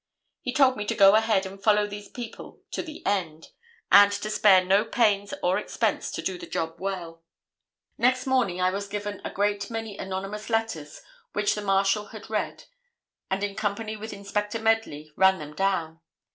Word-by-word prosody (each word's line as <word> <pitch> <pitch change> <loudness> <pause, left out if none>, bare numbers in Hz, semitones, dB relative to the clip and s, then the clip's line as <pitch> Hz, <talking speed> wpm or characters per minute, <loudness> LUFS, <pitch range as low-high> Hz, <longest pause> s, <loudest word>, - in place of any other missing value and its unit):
He 250 - -3
told 265 -1 +4
me 210 - -3
to - - -1
go 195 0 +7
ahead 220 -3 +3
and 195 +1 -9
follow 210 0 +4
these 205 0 -8
people 240 -2 -9
to - - -2
the 315 -3 -10
end, 165 -6 -2 0.4
and 200 0 +8
to 205 +1 -3
spare 195 -4 +5
no 195 +3 +4
pains 210 -3 +1
or 180 +1 +2
expense - - -1
to - - -4
do 185 -2 -3
the - - -8
job 165 0 -3
well. 175 -4 -5 0.8
"Next 255 +1 +2
morning 250 -9 +1
I 185 0 +2
was 200 +1 -4
given 205 0 -5
a - - -3
great 205 0 -1
many 225 -3 -5
anonymous 195 +3 -5
letters 225 -10 -2 0.3
which 205 0 +1
the 210 - -4
Marshal 195 +1 +2
had 220 +1 -11
read, 215 - -2 0.7
and 195 +1 -1
in 205 -1 -2
company 215 +2 -3
with 220 +1 -7
Inspector 205 +2 -3
Medley, 220 -10 0
ran 190 0 +5
them 150 -2 -8
down. 165 -2 -1
205 Hz, 180 wpm, -26 LUFS, 190-215 Hz, 0.8 s, and